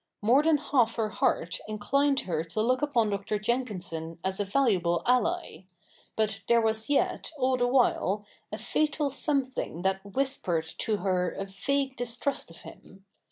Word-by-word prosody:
More 245 +7 +5
than 315 0 +4
half 260 -5 +1
her 220 -2 0
heart 165 -4 0
inclined 275 +7 +1
her 160 -3 -2
to 170 +6 -3
look 255 +3 +2
upon 240 -8 +2
Dr. 200 +1 -2
Jenkinson 185 -8 -2
as 190 +1 -2
a 205 - 0
valuable 190 -7 +1
ally; 250 - 0 0.5
but 215 -2 0
there 235 0 +5
was 220 +1 -1
yet, 290 - +1
all 260 -1 +2
the 245 -1 +1
while, 225 -5 +2 0.3
a - - -4
fatal 300 -2 0
something 260 - -1
that 190 0 0
whispered 200 -7 -1
to 215 -2 0
her 185 -2 0
a 195 - -4
vague 270 +7 -1
distrust 245 +1 -2
of 165 - -12
him. 195 0 -14
220 Hz, 160 wpm, -28 LUFS, 190-265 Hz, 0.5 s, More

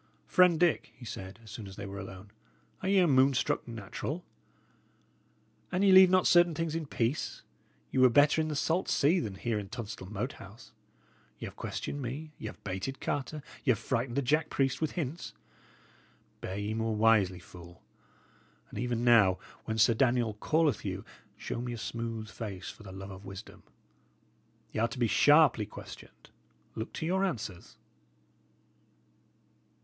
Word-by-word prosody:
"Friend 180 -3 +5
Dick," 175 -2 +2
he 120 - -11
said, 95 -1 -7
as 110 - -12
soon 110 -3 -7
as 95 - -10
they 100 - -6
were 100 0 -6
alone, 95 +1 -9 0.5
"are 190 - -1
ye 200 - +4
a 180 -2 +5
moon 135 -1 +4
struck 125 - 0
natural? 115 - -5 1.5
An 185 +1 +1
ye 195 - +6
leave 190 0 +9
not 185 0 +4
certain 175 -2 +5
things 165 -1 -2
in 160 -2 -3
peace, 120 +3 -2 0.5
ye - - 0
were 130 0 +7
better 145 +4 +5
in 155 - -1
the 155 - -3
salt 165 +5 0
sea 160 +6 +3
than 105 - -4
here 110 +2 -1
in 100 -1 -7
Tunstall 105 -5 -6
Moat 110 +5 -3
House. 100 +4 -13 0.7
Y' - - -6
have - - -8
questioned 145 - -4
me; 140 +5 -5
y' - - -5
have - - -10
baited 100 +8 -4
Carter; 145 +1 -3 0.2
y' 145 - -1
have 120 - +5
frighted 120 +1 -2
the 140 - +1
Jack 150 +5 +1
priest 135 +1 0
with 155 - -1
hints. 145 -8 -4 1.1
Bear 95 - -5
ye 105 +1 -2
more 110 0 -1
wisely, 105 -4 +4
fool; 85 -1 -14 0.9
and - - -6
even 120 0 -1
now, 105 -6 +6 0.3
when 110 - -2
Sir 110 +1 +5
Daniel 120 -2 +2
calleth 155 -2 +2
you, - - -4 0.3
show 115 - -4
me 120 0 -4
a - - -5
smooth 115 -1 -4
face 100 -3 -6
for - - -17
the 100 -2 -10
love 95 +1 -8
of 95 +1 -10
wisdom. 95 +2 -10 1.1
Y' - - -2
are 115 - +3
to 125 - -8
be 120 - +2
sharply 140 -1 +5
questioned. - - -12 0.4
Look 110 - -5
to 160 - -4
your 190 +3 +1
answers." 110 - -4
120 Hz, 175 wpm, -30 LUFS, 105-150 Hz, 1.5 s, leave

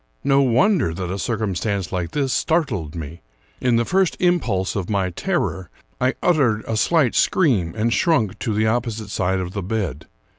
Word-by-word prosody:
No 140 0 +4
wonder 130 - +2
that 90 0 -4
a 100 - -3
circumstance 100 -4 -2
like 90 -3 -2
this 135 -3 -1
startled 115 - 0
me. 80 +1 -7 0.4
In 125 -2 +2
the 115 0 +2
first 190 +3 +1
impulse 125 - +1
of 95 -4 -3
my 95 -3 0
terror, 90 +1 -2 0.3
I 130 +1 +1
uttered 130 -11 +2
a 115 - -1
slight 140 +2 +2
scream 105 - +2
and 115 +2 +1
shrunk 115 - +1
to 115 - -2
the 110 +1 +1
opposite 110 -2 -2
side 95 0 0
of 90 0 -5
the 100 - -3
bed. 90 - -3
110 Hz, 175 wpm, -21 LUFS, 95-130 Hz, 0.4 s, No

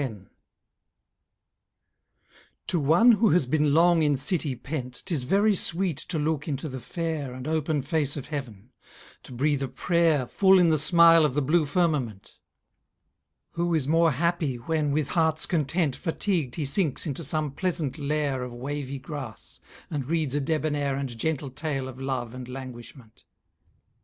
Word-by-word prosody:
To 175 - 0
one 165 - +5
who 225 -1 +4
has 165 -4 +3
been 150 +2 +1
long 170 +2 +4
in 145 -2 +2
city 150 -1 0
pent, 125 -2 -6
'Tis 155 -9 -2
very 200 +8 +3
sweet 175 -3 0
to 170 - -4
look 150 0 -1
into 145 0 -3
the 130 -2 -6
fair 155 -3 -4
And 130 +2 -7
open 155 -2 0
face 150 -1 -1
of 140 - -5
heaven, 125 -7 -7 0.5
to - - -14
breathe 140 +3 0
a 135 - -1
prayer 160 0 +1
Full 190 +8 +4
in 175 -2 +5
the 155 -1 +2
smile 165 +1 +6
of 150 -4 +1
the 145 - +2
blue 155 +2 +2
firmament. 145 - -1 1.1
Who 170 0 0
is 145 -4 0
more 165 +2 +4
happy, 170 -2 0
when, 150 +5 -1
with 145 -1 0
hearts 160 -2 +2
content, 160 -3 0
Fatigued 165 - -2
he 155 - -2
sinks 150 +1 0
into 155 +1 -4
some 155 0 -1
pleasant 160 -3 -3
lair 145 -2 -1
Of 125 -1 -6
wavy 140 +2 -4
grass, 135 -4 -8 0.3
and 145 -4 -2
reads 155 -4 0
a 145 - 0
debonair 150 -2 -1
And 135 -3 -4
gentle 140 +2 -2
tale 135 -2 -3
of 130 0 -9
love 130 -3 -3
and 130 -1 -8
languishment? 125 -2 -10
150 Hz, 155 wpm, -26 LUFS, 130-165 Hz, 1.1 s, smile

